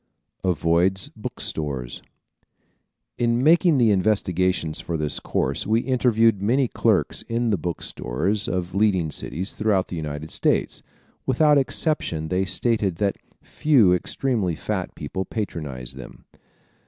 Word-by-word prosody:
Avoids 90 Hz, +2 st, +1 dB
Book -, -, -7 dB
Stores 65 Hz, -6 st, -4 dB, 1.2 s
¶ -, -, -2 dB
In 120 Hz, +1 st, +2 dB
making 165 Hz, 0 st, +5 dB
the 115 Hz, -4 st, +4 dB
investigations 95 Hz, -5 st, +1 dB
for 85 Hz, -, -3 dB
this 75 Hz, -1 st, -1 dB
course, -, -, -1 dB
we 110 Hz, +2 st, +3 dB
interviewed 115 Hz, -5 st, +2 dB
many 125 Hz, +6 st, +2 dB
clerks -, -, +1 dB
in 115 Hz, 0 st, -1 dB
the 100 Hz, -, +2 dB
bookstores 90 Hz, -, -2 dB
of 90 Hz, -1 st, -2 dB
leading 95 Hz, -6 st, +2 dB
cities 95 Hz, +6 st, -4 dB
throughout 105 Hz, -4 st, +1 dB
the -, -, -5 dB
United 75 Hz, -1 st, -5 dB
States. -, -, 0 dB, 0.5 s
Without 145 Hz, +3 st, +4 dB
exception 125 Hz, -, 0 dB
they 95 Hz, +2 st, +1 dB
stated 105 Hz, -1 st, 0 dB
that 100 Hz, +3 st, 0 dB, 0.3 s
few 125 Hz, -12 st, +3 dB
extremely 100 Hz, -1 st, -1 dB
fat -, -, -4 dB
people 95 Hz, +6 st, -4 dB
patronized 75 Hz, -, -5 dB
them. -, -, -11 dB
95 Hz, 130 wpm, -23 LUFS, 85-115 Hz, 1.2 s, making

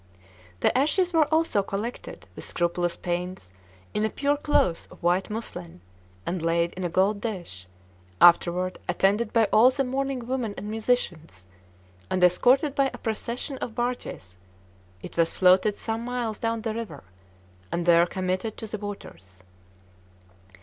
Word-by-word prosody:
The -, -, +2 dB
ashes 330 Hz, +7 st, +2 dB
were 315 Hz, -2 st, +3 dB
also 315 Hz, -10 st, +2 dB
collected 205 Hz, +5 st, -5 dB
with -, -, -8 dB
scrupulous 175 Hz, 0 st, -1 dB
pains 175 Hz, -, -4 dB, 0.4 s
in 210 Hz, -, 0 dB
a 220 Hz, -, +2 dB
pure 285 Hz, +4 st, 0 dB
cloth 285 Hz, -, +1 dB
of -, -, -16 dB
white 180 Hz, +4 st, +2 dB
muslin, 90 Hz, -, -6 dB, 0.5 s
and 180 Hz, -1 st, -2 dB
laid 170 Hz, +1 st, +1 dB
in 185 Hz, -, -6 dB
a 175 Hz, -, -1 dB
gold 195 Hz, +4 st, +1 dB
dish; 175 Hz, -, -6 dB, 0.5 s
afterward, 175 Hz, +1 st, +4 dB
attended 210 Hz, +3 st, +2 dB
by 230 Hz, -, +4 dB
all 230 Hz, +4 st, +7 dB
the 275 Hz, +1 st, 0 dB
mourning 265 Hz, -1 st, -2 dB
women 240 Hz, -4 st, -2 dB
and 210 Hz, -, -5 dB
musicians, 185 Hz, -, -2 dB, 0.6 s
and 185 Hz, -, 0 dB
escorted 255 Hz, -, +4 dB
by 275 Hz, -1 st, +2 dB
a -, -, -8 dB
procession 235 Hz, +4 st, -4 dB
of 225 Hz, -, -5 dB
barges, 240 Hz, -, -4 dB, 0.7 s
it -, -, -9 dB
was 165 Hz, -1 st, +2 dB
floated 190 Hz, +3 st, +4 dB
some 225 Hz, 0 st, -3 dB
miles 240 Hz, -3 st, -3 dB
down 230 Hz, 0 st, -1 dB
the 220 Hz, -1 st, -2 dB
river, 215 Hz, -11 st, -6 dB, 0.7 s
and 170 Hz, 0 st, -1 dB
there 170 Hz, 0 st, +5 dB
committed 185 Hz, +4 st, -2 dB
to -, -, -6 dB
the 215 Hz, -1 st, -5 dB
waters. 95 Hz, -, -9 dB
210 Hz, 150 wpm, -26 LUFS, 175-245 Hz, 0.7 s, all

